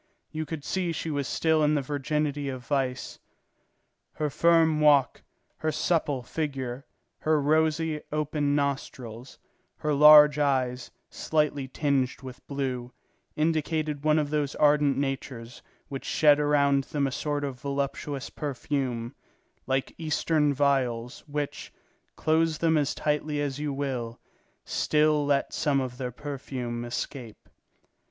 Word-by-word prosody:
You 155 Hz, 0 st, -4 dB
could 160 Hz, -3 st, -5 dB
see 185 Hz, -2 st, -1 dB
she 165 Hz, 0 st, -3 dB
was 140 Hz, -2 st, -2 dB
still 160 Hz, -1 st, +2 dB
in 150 Hz, +1 st, +3 dB
the 145 Hz, -, +1 dB
virginity 145 Hz, 0 st, -2 dB
of 130 Hz, -2 st, -6 dB
vice. 130 Hz, -2 st, -2 dB, 0.9 s
Her 150 Hz, -2 st, -2 dB
firm 165 Hz, -1 st, +4 dB
walk, 145 Hz, -3 st, +4 dB, 0.4 s
her 155 Hz, -, -1 dB
supple 150 Hz, -5 st, 0 dB
figure, 135 Hz, -2 st, -4 dB, 0.3 s
her 155 Hz, -1 st, +2 dB
rosy, 155 Hz, +1 st, +1 dB
open 150 Hz, -1 st, 0 dB
nostrils, 130 Hz, -4 st, -4 dB, 0.4 s
her 150 Hz, 0 st, -1 dB
large 150 Hz, 0 st, +8 dB
eyes, 130 Hz, -3 st, 0 dB, 0.2 s
slightly 150 Hz, -3 st, 0 dB
tinged 135 Hz, -1 st, -1 dB
with 130 Hz, -1 st, -10 dB
blue, 130 Hz, -3 st, -3 dB, 0.4 s
indicated 155 Hz, -1 st, -1 dB
one 155 Hz, 0 st, +3 dB
of 150 Hz, -2 st, 0 dB
those 150 Hz, -2 st, -1 dB
ardent 145 Hz, -2 st, +3 dB
natures 135 Hz, -4 st, -4 dB, 0.3 s
which 135 Hz, -2 st, -6 dB
shed 150 Hz, -1 st, +4 dB
around 140 Hz, -2 st, +3 dB
them 145 Hz, -2 st, -1 dB
a 135 Hz, -, -1 dB
sort 145 Hz, +2 st, -2 dB
of 135 Hz, -3 st, -4 dB
voluptuous 140 Hz, 0 st, -3 dB
perfume, 130 Hz, -4 st, -3 dB, 0.5 s
like 135 Hz, 0 st, -1 dB
Eastern 155 Hz, -1 st, +1 dB
vials, 130 Hz, -4 st, 0 dB
which, 145 Hz, -1 st, -4 dB, 0.4 s
close 160 Hz, 0 st, +1 dB
them 160 Hz, 0 st, +2 dB
as 145 Hz, -2 st, +1 dB
tightly 150 Hz, 0 st, -1 dB
as 145 Hz, -1 st, -2 dB
you 150 Hz, -1 st, -2 dB
will, 130 Hz, -4 st, -3 dB, 0.5 s
still 150 Hz, -1 st, +2 dB
let 140 Hz, -1 st, +1 dB
some 145 Hz, -3 st, +1 dB
of 125 Hz, -2 st, -4 dB
their 125 Hz, -2 st, -3 dB
perfume 125 Hz, -3 st, -5 dB
escape. 120 Hz, -1 st, -6 dB
145 Hz, 130 wpm, -27 LUFS, 135-150 Hz, 0.9 s, large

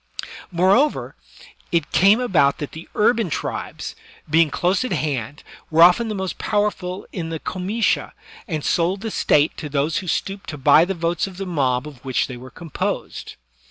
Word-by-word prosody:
Moreover, 190 Hz, -, +2 dB, 0.6 s
it 165 Hz, -3 st, 0 dB
came 200 Hz, +5 st, +5 dB
about 175 Hz, -, +3 dB
that 145 Hz, -, -5 dB
the 160 Hz, +1 st, -10 dB
urban 225 Hz, -2 st, +2 dB
tribes, -, -, -4 dB, 0.3 s
being 160 Hz, +1 st, +4 dB
close 180 Hz, -, +1 dB
at 255 Hz, -, -4 dB
hand, 145 Hz, -1 st, -2 dB, 0.3 s
were 165 Hz, +1 st, +6 dB
often 180 Hz, +7 st, +6 dB
the 215 Hz, -, -3 dB
most 190 Hz, -1 st, -4 dB
powerful 205 Hz, -3 st, -1 dB
in 165 Hz, -4 st, -4 dB
the 160 Hz, -1 st, -4 dB
comitia^ 195 Hz, +8 st, -1 dB, 0.4 s
and 155 Hz, -6 st, -3 dB
sold 180 Hz, +3 st, +1 dB
the 225 Hz, -1 st, -4 dB
State 150 Hz, -4 st, +2 dB
to 150 Hz, -, -6 dB
those 145 Hz, +3 st, 0 dB
who 185 Hz, -, -4 dB
stooped 195 Hz, +3 st, -3 dB
to 150 Hz, -, -5 dB
buy 150 Hz, +4 st, +6 dB
the 195 Hz, +1 st, -3 dB
votes 170 Hz, +2 st, -1 dB
of 185 Hz, -2 st, -11 dB
the 195 Hz, -, -4 dB
mob 135 Hz, -6 st, 0 dB
of 140 Hz, -5 st, -12 dB
which 130 Hz, -2 st, 0 dB
they 125 Hz, -, -7 dB
were 125 Hz, +1 st, -10 dB
composed. 165 Hz, +2 st, -4 dB
170 Hz, 175 wpm, -22 LUFS, 150-195 Hz, 0.6 s, were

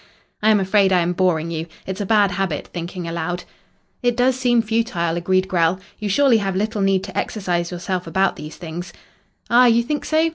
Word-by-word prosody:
"I 215 Hz, -, +3 dB
am 215 Hz, -1 st, +5 dB
afraid 195 Hz, 0 st, +3 dB
I 180 Hz, -1 st, +4 dB
am 170 Hz, +1 st, 0 dB
boring 170 Hz, -3 st, +1 dB
you. 165 Hz, 0 st, -4 dB, 0.2 s
It's 190 Hz, +2 st, -4 dB
a 200 Hz, -, -3 dB
bad 205 Hz, -2 st, +4 dB
habit, 180 Hz, -5 st, -2 dB
thinking 175 Hz, 0 st, -5 dB
aloud." 170 Hz, +1 st, -3 dB, 0.6 s
"It 245 Hz, -2 st, +1 dB
does 250 Hz, +1 st, +3 dB
seem 245 Hz, -3 st, +2 dB
futile," 215 Hz, -7 st, -1 dB
agreed 185 Hz, +2 st, +1 dB
Grell. 175 Hz, -1 st, +1 dB, 0.2 s
"You 210 Hz, -1 st, -3 dB
surely 265 Hz, +3 st, +4 dB
have 195 Hz, -3 st, -2 dB
little 210 Hz, +2 st, -1 dB
need 195 Hz, -1 st, +2 dB
to -, -, -8 dB
exercise 175 Hz, -5 st, -1 dB
yourself 180 Hz, 0 st, -4 dB
about 190 Hz, +3 st, +1 dB
these 150 Hz, +1 st, -9 dB
things." 175 Hz, +1 st, -7 dB, 0.6 s
"Ah, 245 Hz, +1 st, +7 dB
you 235 Hz, 0 st, +4 dB
think 295 Hz, +5 st, -2 dB
so? 320 Hz, +1 st, +2 dB
190 Hz, 195 wpm, -21 LUFS, 175-220 Hz, 0.6 s, Ah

